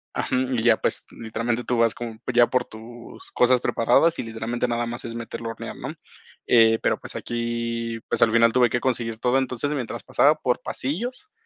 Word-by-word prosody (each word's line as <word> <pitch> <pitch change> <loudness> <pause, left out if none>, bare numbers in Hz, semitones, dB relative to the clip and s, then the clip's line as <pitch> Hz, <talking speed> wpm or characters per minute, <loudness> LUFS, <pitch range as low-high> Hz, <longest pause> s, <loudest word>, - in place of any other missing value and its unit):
Ajú, - - -1
y 130 -2 0
ya, 115 -1 +4
pues, - - -2
literalmente 115 +1 -3
tú 125 - -1
vas 115 -1 +3
con 115 -2 -7
ya 120 0 +7
por 125 -1 0
tus 115 +2 -12
cosas 125 0 +3
preparadas 125 +10 +2
y - - -1
literalmente 115 +2 -3
nada 120 0 -1
más 120 0 -6
es 115 0 -6
meterlo 115 0 -6
a - - -4
hornear, - - -8
¿no?, - - -6 0.5
eh, 115 -1 +5
pero - - +1
pues, - - -9
aquí, 115 -1 -3
pues, - - -1
al 115 - +5
final 115 0 +4
tuve 125 -1 +4
que 120 - 0
conseguir 115 -3 -1
todo, 125 +3 +2
entonces, 130 +2 -2
mientras 135 -6 -4
pasaba 150 +2 +4
por 125 -5 -1
pasillos, 240 - -4
120 Hz, 200 wpm, -24 LUFS, 115-125 Hz, 0.5 s, ya